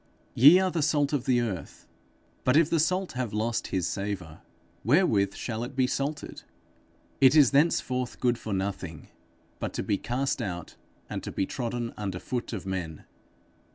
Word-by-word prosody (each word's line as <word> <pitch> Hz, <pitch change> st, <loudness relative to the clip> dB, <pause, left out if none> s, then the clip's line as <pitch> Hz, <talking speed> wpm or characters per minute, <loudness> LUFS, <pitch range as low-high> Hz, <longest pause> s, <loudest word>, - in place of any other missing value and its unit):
_ -, -, -37 dB, 0.3 s
'Ye 145 Hz, +9 st, +8 dB
are 185 Hz, 0 st, +2 dB
the 170 Hz, -, -1 dB
salt 145 Hz, -1 st, +1 dB
of 135 Hz, -4 st, 0 dB
the 125 Hz, -2 st, +3 dB
earth; 100 Hz, -7 st, -5 dB, 0.6 s
but 130 Hz, +3 st, +4 dB
if 165 Hz, 0 st, +4 dB
the 165 Hz, -, +3 dB
salt 185 Hz, +4 st, +1 dB
have 125 Hz, -4 st, -3 dB
lost 110 Hz, +2 st, -1 dB
his 95 Hz, -3 st, -1 dB
savour, 95 Hz, -6 st, -4 dB, 0.4 s
wherewith 110 Hz, -, +3 dB
shall 115 Hz, -1 st, -4 dB
it 125 Hz, +3 st, -7 dB
be 130 Hz, -1 st, +3 dB
salted? 140 Hz, +4 st, -3 dB, 0.8 s
It 135 Hz, +2 st, +6 dB
is 145 Hz, -6 st, +6 dB
thenceforth 130 Hz, -4 st, +1 dB
good 120 Hz, -1 st, +1 dB
for 110 Hz, -, -6 dB
nothing, 95 Hz, -5 st, -4 dB, 0.5 s
but -, -, -4 dB
to -, -, -2 dB
be 100 Hz, -, 0 dB
cast 130 Hz, +2 st, -1 dB
out, 90 Hz, -6 st, -5 dB, 0.3 s
and -, -, -4 dB
to -, -, -6 dB
be 95 Hz, -, -1 dB
trodden 120 Hz, +1 st, -4 dB
under 100 Hz, -3 st, -3 dB
foot 120 Hz, +6 st, -4 dB
of 110 Hz, -5 st, -5 dB
men. 90 Hz, -5 st, -4 dB
120 Hz, 175 wpm, -27 LUFS, 100-140 Hz, 0.8 s, Ye